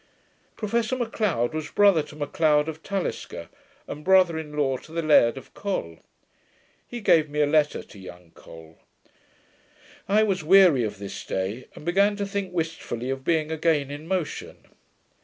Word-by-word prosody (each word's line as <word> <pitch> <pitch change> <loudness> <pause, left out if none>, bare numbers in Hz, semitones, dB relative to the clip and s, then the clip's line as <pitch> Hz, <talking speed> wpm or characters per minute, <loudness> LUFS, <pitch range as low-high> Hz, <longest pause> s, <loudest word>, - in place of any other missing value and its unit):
Professor 230 +3 -1
Macleod 215 - -1
was 155 -1 -4
brother 200 -6 +4
to 150 0 -11
Macleod 150 0 +1
of 160 0 -6
Talisker, 165 - -4 0.4
and 150 - -7
brother 185 -2 +4
in 150 -2 -6
law 135 -3 +1
to 155 - -16
the 165 0 -2
Laird 135 -6 +4
of 135 - -12
Col. 135 - -4 0.9
He 240 -1 -7
gave 160 -6 +4
me 150 +1 -4
a 150 - +4
letter 150 0 +1
to 100 - -15
young 90 -2 -12
Col. 80 0 -15 1.3
I 210 +2 +4
was 195 -5 0
weary 175 -6 +6
of 105 -2 -4
this 100 0 -7
day, 100 +7 -4
and - - -12
began 200 +4 +3
to 200 0 -3
think 200 -2 -4
wishfully 160 -7 -3
of 135 0 -5
being 160 0 0
again 155 -3 0
in 145 +2 -8
motion. 180 -4 -4
155 Hz, 160 wpm, -25 LUFS, 135-190 Hz, 1.3 s, weary